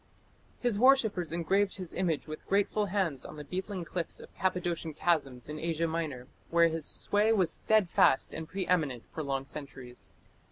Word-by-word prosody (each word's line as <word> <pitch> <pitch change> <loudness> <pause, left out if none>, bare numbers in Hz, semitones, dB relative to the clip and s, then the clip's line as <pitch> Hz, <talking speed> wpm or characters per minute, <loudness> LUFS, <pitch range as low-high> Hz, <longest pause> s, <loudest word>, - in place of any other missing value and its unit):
His 240 -5 +1
worshippers 220 -10 +4
engraved 190 +4 +1
his 185 -3 -7
image 165 -5 -1
with 155 0 -7
grateful 205 +1 +2
hands 185 -8 0
on - - -9
the 150 - -7
beetling 185 +4 -4
cliffs 170 0 -3
of - - -13
Cappadocian 175 -4 -1
chasms 140 -9 0
in 150 +1 -5
Asia 165 0 0
Minor, 155 -6 -3 0.2
where 170 0 +5
his 160 -2 -4
sway 210 +2 +1
was 185 -7 +3
steadfast 200 -10 +3
and 160 0 -5
pre 190 +2 -3
eminent 150 -10 +1
for 160 - -4
long 135 -2 -2
centuries. 135 -3 -9
170 Hz, 165 wpm, -31 LUFS, 150-190 Hz, 0.2 s, where